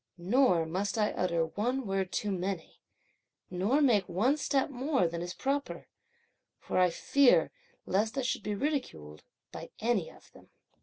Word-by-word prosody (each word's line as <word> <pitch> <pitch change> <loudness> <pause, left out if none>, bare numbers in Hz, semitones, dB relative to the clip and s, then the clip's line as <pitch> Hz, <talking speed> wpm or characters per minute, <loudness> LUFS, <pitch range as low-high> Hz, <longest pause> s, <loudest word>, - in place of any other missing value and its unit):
Nor 180 -2 +3
must 190 +6 -2
I 210 -1 +2
utter 170 -2 0
one 245 +10 -2
word 195 -2 -2
too 210 - -2
many, 185 -2 -4 0.7
nor 200 +11 +1
make 215 -8 +3
one 225 +11 +2
step 280 -2 0
more 265 - 0
than 170 0 -5
is 175 +1 -5
proper, 280 +1 -3 0.7
for 180 -1 +1
fear 275 +9 +3 0.3
lest 220 +7 0
I 270 - 0
should 250 - -1
be 210 0 -3
ridiculed 200 - -3 0.3
by - - -8
any 220 -6 0
of - - -19
them!" - - -18
205 Hz, 150 wpm, -30 LUFS, 180-260 Hz, 0.7 s, Nor